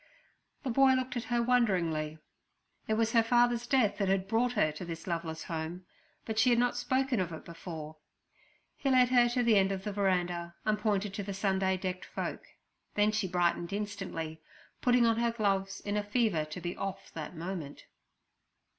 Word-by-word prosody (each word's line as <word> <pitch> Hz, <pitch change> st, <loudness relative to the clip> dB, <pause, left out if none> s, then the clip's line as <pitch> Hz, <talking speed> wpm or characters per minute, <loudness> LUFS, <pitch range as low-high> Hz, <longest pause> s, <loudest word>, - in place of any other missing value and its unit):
The 260 Hz, -, -1 dB
boy 270 Hz, +2 st, +5 dB
looked 255 Hz, 0 st, -1 dB
at 240 Hz, -, -3 dB
her 240 Hz, -1 st, +1 dB
wonderingly. 175 Hz, -11 st, +1 dB, 0.7 s
It 220 Hz, -, +1 dB
was 225 Hz, 0 st, +1 dB
her 230 Hz, -, +5 dB
father's 240 Hz, +1 st, +2 dB
death 245 Hz, -6 st, +2 dB
that 200 Hz, -, +1 dB
had 190 Hz, 0 st, +1 dB
brought 235 Hz, +3 st, +1 dB
her 205 Hz, -9 st, +2 dB
to 150 Hz, +4 st, -8 dB
this 165 Hz, -1 st, -6 dB
loveless 165 Hz, -2 st, -3 dB
home, 165 Hz, +2 st, -5 dB, 0.4 s
but 220 Hz, -1 st, -2 dB
she 220 Hz, -, +5 dB
had 240 Hz, -, +4 dB
not 245 Hz, 0 st, +2 dB
spoken 260 Hz, 0 st, 0 dB
of 180 Hz, -2 st, -1 dB
it 160 Hz, -, -8 dB
before. 160 Hz, -2 st, -8 dB, 0.8 s
He 275 Hz, -, -1 dB
led 255 Hz, -1 st, +5 dB
her 245 Hz, -1 st, +5 dB
to 245 Hz, +1 st, +1 dB
the 230 Hz, -3 st, +5 dB
end 195 Hz, 0 st, +3 dB
of 190 Hz, -1 st, -3 dB
the 210 Hz, -1 st, -3 dB
veranda, 175 Hz, -3 st, 0 dB
and 215 Hz, -1 st, +1 dB
pointed 210 Hz, -2 st, 0 dB
to 205 Hz, -, -3 dB
the 195 Hz, 0 st, -5 dB
Sunday 190 Hz, -1 st, +1 dB
decked 185 Hz, 0 st, -4 dB
folk, -, -, -5 dB, 0.5 s
then 210 Hz, +1 st, +3 dB
she 215 Hz, -2 st, 0 dB
brightened 175 Hz, -1 st, 0 dB
instantly, 185 Hz, -6 st, -4 dB, 0.4 s
putting 245 Hz, -1 st, +4 dB
on 225 Hz, -1 st, +3 dB
her 235 Hz, 0 st, +2 dB
gloves, 195 Hz, -3 st, -1 dB
in 205 Hz, 0 st, -3 dB
a 210 Hz, -, 0 dB
fever 205 Hz, -7 st, +1 dB
to 155 Hz, +3 st, -7 dB
be 175 Hz, 0 st, -4 dB
off 195 Hz, -1 st, -5 dB
that 160 Hz, +2 st, -6 dB
moment. 165 Hz, -3 st, -6 dB
200 Hz, 190 wpm, -31 LUFS, 175-235 Hz, 0.8 s, boy